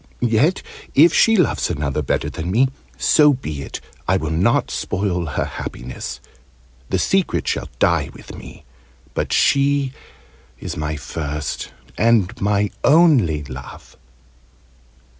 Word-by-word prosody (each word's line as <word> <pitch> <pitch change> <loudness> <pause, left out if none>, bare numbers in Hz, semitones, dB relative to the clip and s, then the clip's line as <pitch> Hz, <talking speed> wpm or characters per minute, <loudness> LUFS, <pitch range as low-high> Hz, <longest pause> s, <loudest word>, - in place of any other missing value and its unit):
Yet, 120 +10 +2 0.3
if 160 +5 +6
she 225 - +5
loves 180 - +1
another 75 -3 -2
better 70 - -1
than 80 +2 -5
me, 125 +7 +3 0.3
so 150 -2 +5
be 75 - -5
it! - - -6 0.3
I 95 - +3
will 80 -3 -3
not 95 +9 +1
spoil 90 -3 -2
her 70 - -2
happiness. 60 +1 -7 0.7
The - - +1
secret 195 -2 0
shall - - -2
die - - +2
with - - -12
me. - - -12 0.5
But - - -2
she 140 -1 +2 0.7
is - - -5
my 75 +1 -3
first 75 0 -4 0.3
and 110 -4 +3
my 100 0 +1
only 140 - +4
love!" 65 -2 -10
95 Hz, 125 wpm, -20 LUFS, -, 0.7 s, if